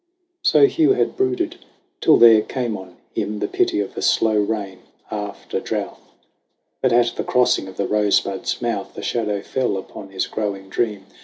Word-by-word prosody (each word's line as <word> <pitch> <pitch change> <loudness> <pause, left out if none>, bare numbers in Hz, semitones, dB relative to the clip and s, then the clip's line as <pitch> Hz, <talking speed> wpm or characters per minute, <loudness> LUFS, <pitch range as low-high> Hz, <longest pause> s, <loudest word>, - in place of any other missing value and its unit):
So - - +5
Hugh 335 -2 +3
had - - 0
brooded, 370 -3 -1 0.4
till 155 - +5
there 115 -2 +8
came 120 -1 -3
on 95 -2 -10 0.2
him 105 0 -2
The 105 - -2
pity - - +1
of 100 - -6
a - - -4
slow 110 -1 +3
rain 100 -3 -1 0.3
after 105 -1 -4
drouth. - - -4 0.8
But 130 - +2
at 120 0 +3
the - - -1
crossing 125 -6 +2
of 95 - -11
the 100 - 0
Rosebud's 105 +1 0
mouth 110 -5 -3
A - - -6
shadow 105 -4 -1
fell 125 -7 -1
upon 95 +1 -9
his 95 -1 -2
growing 100 -3 -4
dream. 105 -2 -2
105 Hz, 170 wpm, -21 LUFS, 100-120 Hz, 0.8 s, there